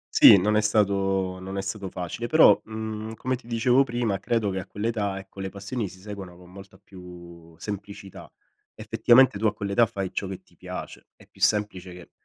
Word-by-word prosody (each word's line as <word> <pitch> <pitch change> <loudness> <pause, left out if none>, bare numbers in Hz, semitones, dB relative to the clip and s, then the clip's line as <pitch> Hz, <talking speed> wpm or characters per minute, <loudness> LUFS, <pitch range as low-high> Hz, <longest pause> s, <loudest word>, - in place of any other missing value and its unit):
Sì, - - +9
non 105 +4 +1
è 105 - +4
stato 95 -3 +1
non 95 +1 -7
è - - -1
stato 100 -1 -5
facile, 90 +7 -5
però, 120 -6 +6
mhmm, 110 0 -6
come 130 +2 -2
ti 120 - -15
dicevo 120 +3 +3
prima, 120 -6 -2
credo 110 -1 -1
che 95 - -3
a 90 - -8
quell'età, 105 -2 -2
ecco, 95 0 -11
le 95 - -4
passioni 100 +2 -5
si 95 - -15
seguano 95 -3 -9
con 90 0 -16
molta 95 0 -13
più 85 -4 -14
semplicità. 100 -1 -8 0.4
Effettivamente 120 -3 +4
tu 110 - +2
a - - -1
quell'età 100 +3 +1
fai 95 -2 -5
ciò 100 - -3
che 95 -1 -8
ti - - -28
piace, - - -9
è - - -19
più - - -22
semplice 95 -4 0
che 90 -1 -13
100 Hz, 195 wpm, -25 LUFS, 95-110 Hz, 0.4 s, Sì